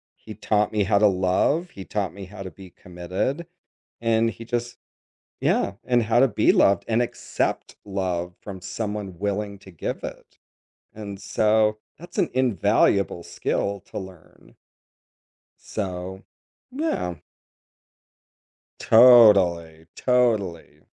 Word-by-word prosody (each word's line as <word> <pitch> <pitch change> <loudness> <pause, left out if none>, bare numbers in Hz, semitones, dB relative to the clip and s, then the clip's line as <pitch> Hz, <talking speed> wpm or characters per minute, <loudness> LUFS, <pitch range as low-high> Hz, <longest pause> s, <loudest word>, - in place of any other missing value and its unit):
he 110 - -11
taught 105 0 0
me 105 - +2
how 100 +1 +2
to 105 - +5
love, 95 - +1
he 95 - -10
taught 100 -4 -3
me 100 0 -9
how 95 +1 -9
to 95 - -8
be 95 +3 -13
committed, 90 - -4 0.5
and 115 0 +2
he 115 +2 -11
just 120 +1 -3 0.6
Yeah, - - +1
and 120 -2 +2
how 115 +2 +2
to 135 - +6
be 100 - +3
loved 100 -2 +3
and 115 +1 +2
accept 120 - -3
love 90 -3 -3
from 95 -3 -9
someone 105 -3 -5
willing 100 0 -3
to 95 - -15
give 85 - -5
it, - - -9 0.6
and 100 -2 -8
so 110 +1 +2 0.2
that's 175 - -12
an - - +2
invaluable 100 -7 +2
skill 100 +3 -2
to - - -8
learn. 95 -4 -14 1.0
So, 95 -1 -6 0.5
yeah. 255 - -2 1.6
Totally, 100 -9 +6
totally. 105 - 0
100 Hz, 125 wpm, -24 LUFS, 95-115 Hz, 1.6 s, to